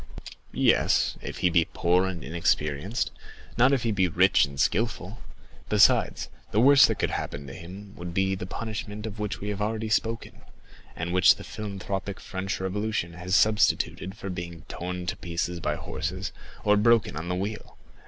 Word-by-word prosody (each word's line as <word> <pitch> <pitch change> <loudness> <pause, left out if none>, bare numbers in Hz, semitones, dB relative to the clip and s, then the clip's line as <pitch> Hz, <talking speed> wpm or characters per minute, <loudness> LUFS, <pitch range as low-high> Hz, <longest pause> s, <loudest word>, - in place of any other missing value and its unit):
"Yes, - - +3
if - - -6
he 90 - +4
be 85 -1 +3
poor 90 +2 +2
and 90 -5 -5
inexperienced, 80 - 0 0.4
not 125 +3 +5
if 135 -4 +1
he 115 - +1
be 95 -3 +2
rich 90 +3 +4
and 70 -1 -10
skilful; 110 +1 0 0.5
besides, - - +4 0.2
the 105 - +1
worst 140 +3 +8
that - - -1
could - - 0
happen 70 0 -4
to 70 - -9
him 95 +5 -10
would 85 0 -6
be 95 +2 +1
the 90 -1 -5
punishment 105 0 -5
of 105 -1 -7
which 105 0 -3
we 105 - -3
have 105 0 -3
already 110 +1 -1
spoken, 115 +2 -1 0.5
and 85 +2 -3
which 90 -1 +6
the - - -10
philanthropic 100 -1 -5
French 95 0 -4
Revolution 95 -2 -2
has 90 +2 -2
substituted 105 -3 +2
for 95 -2 -5
being 85 -2 -7
torn 90 0 -5
to 95 +1 -2
pieces 85 -1 -3
by 75 -2 -1
horses - - -4 0.3
or 105 0 +4
broken 115 -3 +3
on 80 +3 -5
the 90 - 0
wheel. 100 +4 -5
95 Hz, 175 wpm, -27 LUFS, 85-105 Hz, 0.5 s, worst